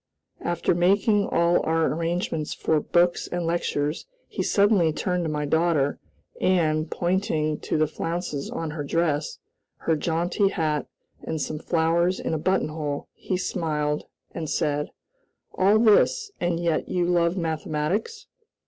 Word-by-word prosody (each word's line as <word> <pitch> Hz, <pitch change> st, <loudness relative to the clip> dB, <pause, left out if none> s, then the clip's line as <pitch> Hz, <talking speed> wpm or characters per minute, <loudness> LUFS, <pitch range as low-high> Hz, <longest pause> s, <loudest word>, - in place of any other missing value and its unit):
After 175 Hz, 0 st, 0 dB
making 200 Hz, +4 st, +3 dB
all 170 Hz, +1 st, +3 dB
our 160 Hz, 0 st, +2 dB
arrangements 165 Hz, -1 st, -2 dB
for 155 Hz, -, +1 dB
books 175 Hz, +3 st, +2 dB
and 175 Hz, -1 st, -3 dB
lectures, 155 Hz, -, -1 dB, 0.2 s
he -, -, -4 dB
suddenly 200 Hz, -5 st, +3 dB
turned 180 Hz, +3 st, -1 dB
to -, -, -1 dB
my 150 Hz, -1 st, -2 dB
daughter, 160 Hz, -2 st, +1 dB, 0.4 s
and, 155 Hz, -4 st, +2 dB
pointing 170 Hz, -5 st, 0 dB
to -, -, -2 dB
the 155 Hz, -, +3 dB
flounces 165 Hz, -1 st, -4 dB
on 165 Hz, -2 st, -4 dB
her 150 Hz, -1 st, -4 dB
dress, 150 Hz, 0 st, 0 dB, 0.5 s
her 165 Hz, -, +3 dB
jaunty 170 Hz, +6 st, +1 dB
hat, 155 Hz, -6 st, -1 dB, 0.3 s
and 160 Hz, -, -4 dB
some 150 Hz, +1 st, -3 dB
flowers 170 Hz, +3 st, +1 dB
in -, -, -2 dB
a 160 Hz, -, 0 dB
buttonhole, 155 Hz, -4 st, -1 dB
he 185 Hz, -, -3 dB
smiled, 150 Hz, -5 st, -1 dB, 0.3 s
and 160 Hz, -3 st, -5 dB
said: 150 Hz, 0 st, 0 dB, 0.6 s
"All 200 Hz, +3 st, +4 dB
this, 235 Hz, -, +4 dB
and 175 Hz, -1 st, 0 dB
yet 170 Hz, -2 st, 0 dB
you 180 Hz, -1 st, +1 dB
love 175 Hz, 0 st, +2 dB
mathematics?" 160 Hz, -, -2 dB
165 Hz, 140 wpm, -25 LUFS, 155-180 Hz, 0.6 s, All